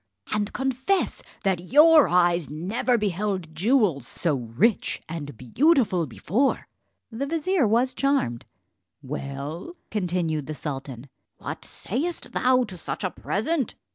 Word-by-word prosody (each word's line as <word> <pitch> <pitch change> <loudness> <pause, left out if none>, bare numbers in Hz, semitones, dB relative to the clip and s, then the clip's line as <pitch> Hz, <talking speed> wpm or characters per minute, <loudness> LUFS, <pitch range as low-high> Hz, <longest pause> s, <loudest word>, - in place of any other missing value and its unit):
and 210 -1 -1
confess 265 +9 0 0.2
that 180 -2 -1
your 310 +1 +8
eyes 175 -3 +2
never 195 - 0
beheld 195 -4 -2
jewels 185 - +2
so 165 -4 0
rich 130 - 0
and 145 -6 -6
beautiful 200 - +2
before." 220 - 0 0.4
The 255 +5 -3
vizier 325 - +1
was 240 +4 +2
charmed. 275 - 0 0.6
"Well," 140 - -6 0.2
continued 175 -7 -1
the 155 - -4
sultan, 135 -3 -6 0.3
"what - - -6
sayest 310 - -4
thou 255 0 +3
to 190 -7 -8
such - - -5
a 185 - -1
present? 265 +5 -2
195 Hz, 120 wpm, -25 LUFS, 155-260 Hz, 0.6 s, your